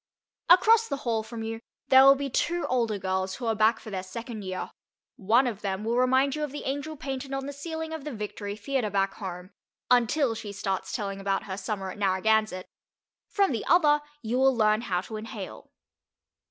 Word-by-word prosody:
Across 440 Hz, +6 st, +6 dB
the 280 Hz, -, -2 dB
hall 225 Hz, -2 st, +1 dB
from 225 Hz, +1 st, -7 dB
you 225 Hz, 0 st, -5 dB, 0.3 s
there 265 Hz, 0 st, +8 dB
will 275 Hz, 0 st, +8 dB
be 280 Hz, 0 st, -3 dB
two 340 Hz, +6 st, 0 dB
older 230 Hz, -4 st, 0 dB
girls 190 Hz, 0 st, -2 dB
who 250 Hz, -, -6 dB
are 225 Hz, -, +2 dB
back 220 Hz, +1 st, +3 dB
for 215 Hz, -, -10 dB
their 190 Hz, -2 st, -3 dB
second 225 Hz, +4 st, -7 dB
year. 185 Hz, -1 st, -5 dB, 0.4 s
One 225 Hz, +7 st, +3 dB
of 220 Hz, -4 st, -3 dB
them 195 Hz, 0 st, -3 dB
will 230 Hz, +2 st, 0 dB
remind 260 Hz, +2 st, +3 dB
you 305 Hz, -, -2 dB
of 295 Hz, -, -3 dB
the 290 Hz, -, -6 dB
angel 285 Hz, +3 st, -3 dB
painted 270 Hz, 0 st, -5 dB
on 270 Hz, 0 st, -2 dB
the 285 Hz, -, -5 dB
ceiling 320 Hz, +2 st, -5 dB
of 320 Hz, -3 st, -6 dB
the 300 Hz, -, -5 dB
Victory 210 Hz, -2 st, -5 dB
Theatre 225 Hz, +1 st, -1 dB
back 195 Hz, 0 st, 0 dB
home, 185 Hz, -1 st, -7 dB, 0.4 s
until 250 Hz, +2 st, +3 dB
she 210 Hz, -2 st, -7 dB
starts 195 Hz, -1 st, -3 dB
telling 195 Hz, -3 st, -3 dB
about 195 Hz, 0 st, 0 dB
her 190 Hz, -, -5 dB
summer 195 Hz, -1 st, -4 dB
at 205 Hz, -, -11 dB
Narragansett; 200 Hz, 0 st, +1 dB, 0.6 s
from 395 Hz, -4 st, +2 dB
the 230 Hz, -, -2 dB
other 300 Hz, -4 st, +5 dB, 0.2 s
you 235 Hz, +3 st, -1 dB
will 265 Hz, -1 st, +4 dB
learn 215 Hz, 0 st, +3 dB
how 180 Hz, -6 st, -1 dB
to 215 Hz, +3 st, -7 dB
inhale. 215 Hz, -3 st, -8 dB
225 Hz, 200 wpm, -27 LUFS, 200-270 Hz, 0.6 s, there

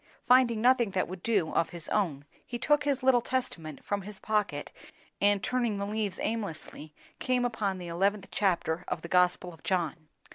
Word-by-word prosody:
Finding 245 Hz, -3 st, +5 dB
nothing 245 Hz, -2 st, +4 dB
that 190 Hz, -1 st, 0 dB
would 185 Hz, 0 st, -7 dB
do, 200 Hz, -8 st, +1 dB
of 165 Hz, -, +2 dB
his 170 Hz, -2 st, -5 dB
own, 155 Hz, -9 st, 0 dB, 0.2 s
he 240 Hz, -, -5 dB
took 295 Hz, +4 st, +2 dB
his 275 Hz, -2 st, 0 dB
little 255 Hz, -2 st, +5 dB
Testament 170 Hz, -, -3 dB
from 205 Hz, 0 st, -1 dB
his 200 Hz, +1 st, -9 dB
pocket, 210 Hz, -2 st, -1 dB, 0.5 s
and 205 Hz, -1 st, +3 dB
turning 240 Hz, -4 st, 0 dB
the 200 Hz, -, -2 dB
leaves 205 Hz, -2 st, -2 dB
aimlessly 165 Hz, -8 st, -4 dB, 0.2 s
came 250 Hz, -1 st, +1 dB
upon 215 Hz, -5 st, -1 dB
the 180 Hz, -1 st, -7 dB
eleventh 195 Hz, +4 st, 0 dB
chapter 180 Hz, -4 st, 0 dB
of -, -, -3 dB
the -, -, -5 dB
Gospel 180 Hz, 0 st, +2 dB
of 165 Hz, -, -16 dB
John. 165 Hz, -4 st, -1 dB
200 Hz, 180 wpm, -29 LUFS, 175-235 Hz, 0.5 s, Finding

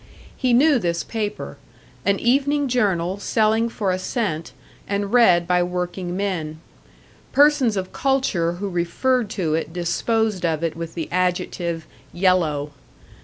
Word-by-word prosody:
He 255 Hz, -2 st, 0 dB
knew 275 Hz, +3 st, +5 dB
this 170 Hz, -4 st, -1 dB
paper; 210 Hz, -2 st, -4 dB, 0.5 s
an 200 Hz, 0 st, +3 dB
evening 280 Hz, +4 st, +2 dB
journal 195 Hz, -7 st, 0 dB
selling 220 Hz, +2 st, +1 dB
for 205 Hz, -4 st, -1 dB
a 185 Hz, -, -1 dB
cent, 185 Hz, -6 st, -3 dB, 0.4 s
and 200 Hz, +1 st, -2 dB
read 180 Hz, -8 st, +5 dB
by 180 Hz, 0 st, +2 dB
working 180 Hz, 0 st, -3 dB
men. 165 Hz, -6 st, -3 dB, 0.7 s
Persons 280 Hz, -6 st, +4 dB
of 185 Hz, -1 st, -4 dB
culture 260 Hz, -12 st, +1 dB
who 195 Hz, +3 st, -4 dB
referred 200 Hz, +7 st, 0 dB
to 170 Hz, -7 st, -1 dB
it 160 Hz, 0 st, -2 dB
disposed 195 Hz, +4 st, 0 dB
of 165 Hz, -2 st, 0 dB
it 165 Hz, -1 st, -1 dB
with 165 Hz, 0 st, -7 dB
the 165 Hz, -2 st, -3 dB
adjective 175 Hz, -2 st, -1 dB, 0.3 s
"yellow." 165 Hz, -6 st, +1 dB
185 Hz, 135 wpm, -22 LUFS, 170-230 Hz, 0.7 s, knew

